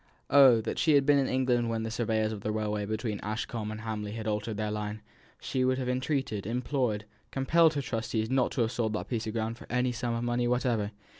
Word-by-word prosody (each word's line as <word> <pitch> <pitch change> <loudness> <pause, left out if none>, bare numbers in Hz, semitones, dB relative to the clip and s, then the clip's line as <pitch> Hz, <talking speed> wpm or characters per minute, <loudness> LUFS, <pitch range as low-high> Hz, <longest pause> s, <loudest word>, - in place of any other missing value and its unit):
Oh, 130 -5 +7
that - - -3
she 155 - +4
had 140 -1 +4
been 145 0 +5
in 135 - +1
England 125 -2 +1
when 115 -1 -1
the 110 - -3
surveyors 110 -2 0
of 105 -2 -6
the 105 - -2
railway 105 -1 -2
between 110 -1 -2
Ashcombe 110 0 -3
and 110 0 -6
Hamley 105 -2 -4
had 110 -1 -5
altered 105 0 -2
their 105 0 -1
line; 105 0 -4 0.4
she 130 - -1
would 130 0 +2
have 130 -1 -2
entreated, 125 -5 -1
implored, 120 -3 -1 0.2
compelled 160 +4 +3
her 140 - -1
trustees 115 -2 -2
not 130 +1 +2
to 130 - 0
have 115 -1 +1
sold 110 -3 -1
that 105 - -4
piece 115 -3 -2
of 110 - -3
ground 115 0 -2
for - - -12
any 125 0 +1
sum 120 0 -2
of 115 - -2
money 120 0 0
whatever. 120 -4 +1
115 Hz, 230 wpm, -29 LUFS, 110-125 Hz, 0.4 s, Oh